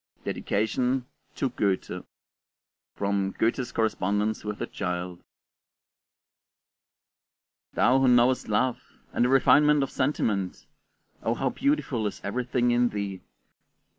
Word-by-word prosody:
DEDICATION: 125 +5 0 0.3
TO 135 - 0
GOETHE 100 -6 -1 0.9
From 100 -1 0
'Goethe's 120 +3 0
Correspondence 105 -1 0
with 105 -1 -5
a - - -2
Child' 90 -1 -4 2.5
Thou, 130 +2 +4
who 135 - +3
knowest 125 +1 +4
love, 125 +4 +1 0.3
and 120 - +2
the - - +2
refinement 145 +2 +5
of 135 - -4
sentiment, 105 -9 -1 0.6
oh 115 - 0
how 135 0 -1
beautiful 245 - 0
is - - -6
everything 120 +3 0
in 120 0 +3
thee! 100 -3 -4
120 Hz, 105 wpm, -27 LUFS, 100-130 Hz, 2.5 s, refinement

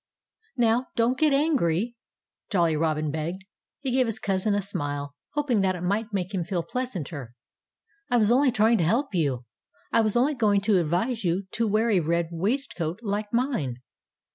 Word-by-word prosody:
"Now, 240 +1 +2
don't 235 +2 +2
get 305 +2 +3
angry!" 240 - +1 0.5
Jolly 170 -5 +2
Robin 155 -1 0
begged. 170 +5 -4 0.4
He 270 -2 -2
gave 255 -1 +3
his 225 -1 -2
cousin 200 0 0
a 205 - +1
smile, 145 -6 -3 0.2
hoping 285 -8 +1
that 190 -1 +1
it 175 - -7
might 210 +5 -1
make 195 -1 -2
him 185 -3 0
feel 175 -1 -2
pleasanter. 165 - -5 0.7
"I 245 - +3
was 215 -1 +4
only 260 +2 +4
trying 225 0 +3
to - - +2
help 230 - +1
you. 140 -8 0 0.5
I 230 - +5
was 215 -1 0
only 260 +5 +3
going 210 -6 +2
to 195 -1 +3
advise 180 +9 0
you 180 +2 0
to 230 0 0
wear 220 +3 +2
a 195 - +4
red 170 +1 0
waistcoat, 180 - -2
like 205 0 -2
mine." 235 - 0
205 Hz, 175 wpm, -26 LUFS, 170-235 Hz, 0.7 s, I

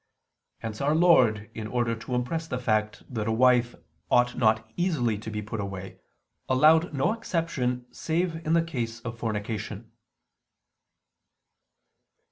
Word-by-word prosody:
Hence 110 -2 -6
Our 145 +2 +2
Lord, 125 -12 +4
in 110 -1 -5
order 120 0 0
to 115 +3 -5
impress 160 +7 -2
the 125 - -3
fact 110 -3 0
that 110 -2 -2
a - - +1
wife 120 +1 +3 0.3
ought 125 0 +3
not 110 -2 +2
easily 150 - +1
to 110 - -7
be 105 -1 -4
put 110 +1 -5
away, 95 -1 -6 0.5
allowed 155 +6 +5
no 140 +8 +1
exception 160 - -2
save 165 0 -1
in 160 - 0
the 165 0 +4
case 115 -8 -4
of 115 0 -7
fornication." 110 -2 -4
120 Hz, 135 wpm, -27 LUFS, 110-160 Hz, 0.5 s, allowed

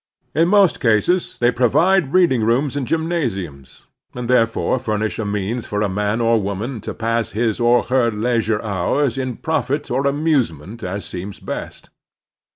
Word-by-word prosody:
In 165 +3 +3
most 195 -2 +4
cases 120 - +1
they 120 0 +3
pro 125 +1 +2
vide 165 +3 +2
reading 165 -11 +3
rooms 130 +5 +1
and 135 -4 -2
gymnasiimas, 115 - -3 0.3
and 125 -1 -4
there 120 -2 +4
fore 115 - -2
f 125 - -10
timish 110 0 -1
a 110 - -2
means 105 +3 -3
for 105 0 -1
a 105 - 0
man 105 +3 -1
or 115 -1 +2
woman 105 +5 -4
to - - -6
pass 115 0 -1
his 110 0 0
or 120 0 +4
her 125 -2 +2
leistu'e 110 -1 0
hours 110 +6 0
in 130 -2 -3
profit 145 -3 -2
or 135 +3 +1
amusement 125 - -1
as 95 0 -4
seems 95 +4 -7
best. - - -7
115 Hz, 170 wpm, -20 LUFS, 105-140 Hz, 0.3 s, most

